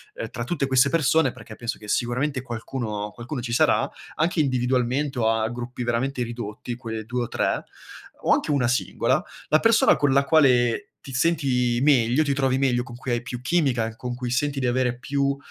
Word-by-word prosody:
ehm, -, -, -5 dB
tra -, -, -5 dB
tutte 145 Hz, -6 st, -1 dB
queste 130 Hz, +1 st, +4 dB
persone, 155 Hz, -3 st, +3 dB
perché 110 Hz, -, -12 dB
penso 120 Hz, -1 st, -4 dB
che 105 Hz, -, -13 dB
sicuramente 125 Hz, +5 st, 0 dB
qualcuno 110 Hz, -3 st, -4 dB
qualcuno 125 Hz, +2 st, -6 dB
ci 115 Hz, -1 st, -4 dB
sarà, -, -, +3 dB, 0.3 s
anche 165 Hz, +2 st, 0 dB
individualmente 130 Hz, +1 st, 0 dB
o 110 Hz, -1 st, +3 dB
a 110 Hz, -1 st, +1 dB
gruppi 120 Hz, +1 st, -5 dB
veramente 125 Hz, +3 st, -1 dB
ridotti 120 Hz, 0 st, -6 dB
quelle 110 Hz, -3 st, -6 dB
2 125 Hz, +1 st, -2 dB
o -, -, -4 dB
3, -, -, 0 dB, 0.6 s
o -, -, +4 dB
anche -, -, 0 dB
1 135 Hz, -5 st, +2 dB
singola, 125 Hz, +1 st, +1 dB, 0.3 s
la 155 Hz, -, +5 dB
persona 230 Hz, +6 st, +5 dB
con 145 Hz, -2 st, +1 dB
la 140 Hz, +1 st, +4 dB
quale 125 Hz, -6 st, +3 dB, 0.2 s
ti 135 Hz, -, -8 dB
senti 130 Hz, -5 st, +1 dB
meglio, 135 Hz, 0 st, +4 dB
ti 140 Hz, -, +1 dB
trovi 135 Hz, -1 st, +1 dB
meglio 130 Hz, -3 st, +2 dB
con 125 Hz, -1 st, -10 dB
cui 130 Hz, 0 st, -4 dB
hai 120 Hz, -, 0 dB
più 125 Hz, -1 st, -6 dB
chimica 135 Hz, -5 st, +1 dB
e 115 Hz, -, -6 dB
con 125 Hz, +1 st, -5 dB
cui 125 Hz, -1 st, -4 dB
senti 140 Hz, +2 st, 0 dB
di 130 Hz, -, -1 dB
avere 125 Hz, 0 st, 0 dB
più 140 Hz, 0 st, 0 dB
125 Hz, 195 wpm, -24 LUFS, 120-140 Hz, 0.6 s, la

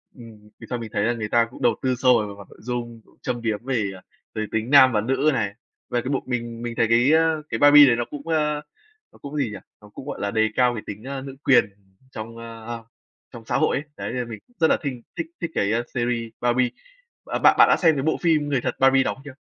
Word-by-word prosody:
ừm, 110 Hz, -4 st, -14 dB
về -, -, -11 dB
sau 125 Hz, -, -3 dB
mình 115 Hz, -2 st, -7 dB
thấy 100 Hz, -, 0 dB
là 120 Hz, -, +1 dB
người 110 Hz, -3 st, -5 dB
ta 115 Hz, +1 st, +3 dB
cũng -, -, -13 dB
đầu -, -, +3 dB
tư 130 Hz, -1 st, 0 dB
sâu 125 Hz, -1 st, +4 dB
về 105 Hz, -, -2 dB
mặt 100 Hz, -, -12 dB
nội -, -, -17 dB
dung, 120 Hz, -1 st, -5 dB
cũng -, -, -26 dB
châm 120 Hz, -1 st, -3 dB
biếm 110 Hz, 0 st, -2 dB
về, 115 Hz, -7 st, -1 dB
à, 95 Hz, -, -13 dB, 0.3 s
về 110 Hz, -, -2 dB
tính 110 Hz, +2 st, -2 dB
nam 130 Hz, -2 st, +7 dB
và 105 Hz, -, +2 dB
nữ 135 Hz, +6 st, +1 dB
này. 105 Hz, -6 st, -1 dB, 0.4 s
Và 120 Hz, -1 st, 0 dB
cái 125 Hz, -, -5 dB
bộ 140 Hz, -, -1 dB
mình 120 Hz, -2 st, -4 dB
mình 120 Hz, -1 st, -5 dB
thấy, 115 Hz, -, +3 dB
a, -, -, -12 dB
cái 155 Hz, +7 st, +3 dB
cái 115 Hz, -, -2 dB
"Barbie" 145 Hz, 0 st, +8 dB
đấy 120 Hz, -, +4 dB
nó 120 Hz, 0 st, -2 dB
cũng, 145 Hz, +1 st, -8 dB
ơ, 150 Hz, -2 st, 0 dB, 0.5 s
nó -, -, -19 dB
cũng 145 Hz, +1 st, -8 dB
gì 130 Hz, -6 st, 0 dB
nhỉ? 105 Hz, -, -6 dB, 0.2 s
Nó 105 Hz, -, -15 dB
cũng, 130 Hz, -, -11 dB
gọi -, -, -5 dB
là, 100 Hz, -, -1 dB
đề 110 Hz, 0 st, +2 dB
cao 125 Hz, -1 st, +3 dB
cái 110 Hz, -, -6 dB
tính, 105 Hz, +1 st, -7 dB
a, 135 Hz, +1 st, -5 dB
nữ 135 Hz, 0 st, -8 dB
quyền 135 Hz, -, +5 dB, 0.5 s
trong, 115 Hz, +1 st, -8 dB
a, 115 Hz, 0 st, -7 dB, 0.6 s
trong 115 Hz, -2 st, -11 dB
xã -, -, 0 dB
hội -, -, +2 dB
ấy, 140 Hz, -, -4 dB
đấy, -, -, -4 dB
nên -, -, -3 dB
là 125 Hz, -, -2 dB
mình 110 Hz, -2 st, -7 dB
cũng 245 Hz, -, -31 dB
rất 160 Hz, -, +4 dB
là -, -, +3 dB
thinh 130 Hz, -4 st, -4 dB, 0.2 s
thích 330 Hz, -, -3 dB
thích 170 Hz, -, -3 dB
cái, 100 Hz, -, +1 dB
a, 115 Hz, -, +1 dB
series 120 Hz, -2 st, -1 dB
"Barbie." 125 Hz, +1 st, +2 dB, 0.6 s
Bạn -, -, -3 dB
bạn -, -, +7 dB
bạn -, -, +9 dB
đã -, -, +5 dB
xem 165 Hz, -3 st, +5 dB
cái 135 Hz, -, -2 dB
bộ 160 Hz, -, +1 dB
phim 155 Hz, -4 st, +2 dB
người 135 Hz, -4 st, 0 dB
thật -, -, -2 dB
"Barbie" 135 Hz, 0 st, +5 dB
đóng -, -, -2 dB
chưa? 145 Hz, -2 st, -10 dB
120 Hz, 275 wpm, -23 LUFS, 115-140 Hz, 0.6 s, bạn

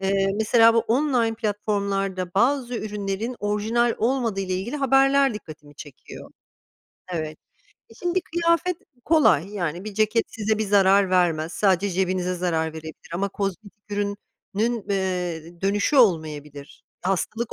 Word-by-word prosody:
Eee, 195 Hz, 0 st, +1 dB
mesela 230 Hz, +1 st, +5 dB
bu -, -, +4 dB
online 240 Hz, -2 st, +1 dB
platformlarda 200 Hz, -4 st, -2 dB
bazı 250 Hz, +2 st, +1 dB
ürünlerin 210 Hz, +3 st, -4 dB
orijinal 220 Hz, +3 st, +1 dB
olmadığıyla 220 Hz, -7 st, 0 dB
ilgili 225 Hz, +10 st, -3 dB
haberler 270 Hz, -1 st, +3 dB
dikkatimi 155 Hz, -6 st, -11 dB
çekiyor. 145 Hz, -4 st, -11 dB, 0.8 s
Evet. 155 Hz, -1 st, -4 dB, 0.5 s
E, -, -, -15 dB
şimdi 355 Hz, +1 st, -1 dB
kıyafet 335 Hz, +1 st, 0 dB, 0.3 s
kolay. 215 Hz, -, +4 dB
Yani, 175 Hz, -2 st, -3 dB
bir 215 Hz, -, -7 dB
ceket 215 Hz, +2 st, +2 dB
size 220 Hz, -1 st, -1 dB
bir 220 Hz, -, 0 dB
zarar 195 Hz, -1 st, +4 dB
vermez. 170 Hz, -3 st, +1 dB
Sadece 195 Hz, 0 st, +2 dB
cebinize 185 Hz, 0 st, -1 dB
zarar 165 Hz, -3 st, -1 dB
verebilir 160 Hz, 0 st, -10 dB
ama 195 Hz, +3 st, -1 dB
kozmetik 200 Hz, +1 st, -5 dB
ürünün, 205 Hz, 0 st, -2 dB, 0.7 s
eee, 180 Hz, -3 st, -3 dB
dönüşü 205 Hz, +8 st, +1 dB
olmayabilir. 150 Hz, -, 0 dB, 0.2 s
Hastalık 210 Hz, +5 st, -2 dB
200 Hz, 125 wpm, -24 LUFS, 180-230 Hz, 0.8 s, mesela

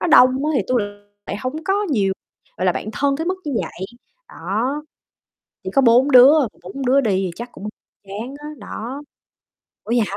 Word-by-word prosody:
nó -, -, 0 dB
đông 255 Hz, -6 st, +7 dB, 0.2 s
á, -, -, +1 dB
thì 230 Hz, -, +2 dB
tui 250 Hz, -1 st, +2 dB
lại 205 Hz, -, -3 dB, 0.4 s
lại -, -, -3 dB
hông 260 Hz, -, -5 dB
có 390 Hz, 0 st, +1 dB, 0.2 s
nhiều, 200 Hz, -8 st, +2 dB, 0.4 s
gọi 185 Hz, -, -1 dB
là, 180 Hz, -, +4 dB
bạn 205 Hz, -, -5 dB
thân 280 Hz, +3 st, +1 dB
tới 320 Hz, -, -3 dB
mức 370 Hz, -, +1 dB
như 295 Hz, -, -3 dB
vậy, 190 Hz, -, -6 dB, 0.4 s
đó. 225 Hz, -, -2 dB, 0.8 s
Chỉ -, -, -4 dB
có 275 Hz, -, +4 dB
4 250 Hz, +3 st, +5 dB
đứa, 265 Hz, +4 st, +8 dB
mà 265 Hz, -, +1 dB, 0.2 s
4 260 Hz, +9 st, -6 dB
đứa 270 Hz, +2 st, +4 dB
đi 220 Hz, -, +1 dB
thì 190 Hz, -2 st, 0 dB
chắc 240 Hz, +4 st, -7 dB
cũng 210 Hz, -, -8 dB, 0.4 s
chán 220 Hz, +7 st, -6 dB
á, 295 Hz, -, -8 dB
đó. 245 Hz, +5 st, -7 dB, 0.8 s
Ủa -, -, -8 dB
vậy 240 Hz, -, +3 dB
hả? 200 Hz, -, -5 dB
250 Hz, 215 wpm, -20 LUFS, 205-280 Hz, 0.8 s, đứa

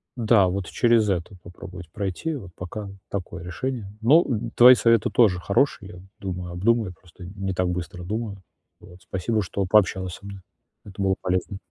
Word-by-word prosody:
Да, 110 Hz, -5 st, +4 dB
вот 95 Hz, +1 st, -2 dB
через 115 Hz, -3 st, +3 dB
это 95 Hz, +1 st, -2 dB
попробовать 90 Hz, -1 st, -10 dB
пройти, 100 Hz, -, -3 dB
вот 95 Hz, -9 st, -9 dB
пока 100 Hz, +3 st, -7 dB, 0.2 s
такое 90 Hz, -3 st, -5 dB
решение. 105 Hz, +4 st, -4 dB
Ну, 150 Hz, +10 st, +5 dB, 0.3 s
твои 125 Hz, +1 st, +9 dB
советы 115 Hz, -2 st, +3 dB
тоже 100 Hz, -7 st, +4 dB
хорошие, 100 Hz, +1 st, +1 dB
я, -, -, -11 dB, 0.2 s
думаю, 90 Hz, -2 st, -5 dB
обдумаю, 105 Hz, +1 st, +1 dB
просто 90 Hz, +1 st, -15 dB
не 95 Hz, +1 st, -4 dB
так 90 Hz, 0 st, 0 dB
быстро 90 Hz, 0 st, -5 dB
думаю. 105 Hz, +1 st, -4 dB, 0.4 s
Вот, 90 Hz, +1 st, -16 dB
спасибо, 110 Hz, +4 st, -1 dB
что 100 Hz, +1 st, -2 dB
пообщалась 95 Hz, -2 st, +2 dB
со -, -, -15 dB
мной. 100 Hz, -1 st, -9 dB, 0.4 s
Это 100 Hz, -1 st, -8 dB
было 95 Hz, -1 st, +2 dB
полезно. 90 Hz, +2 st, -1 dB
95 Hz, 165 wpm, -24 LUFS, 90-110 Hz, 0.4 s, твои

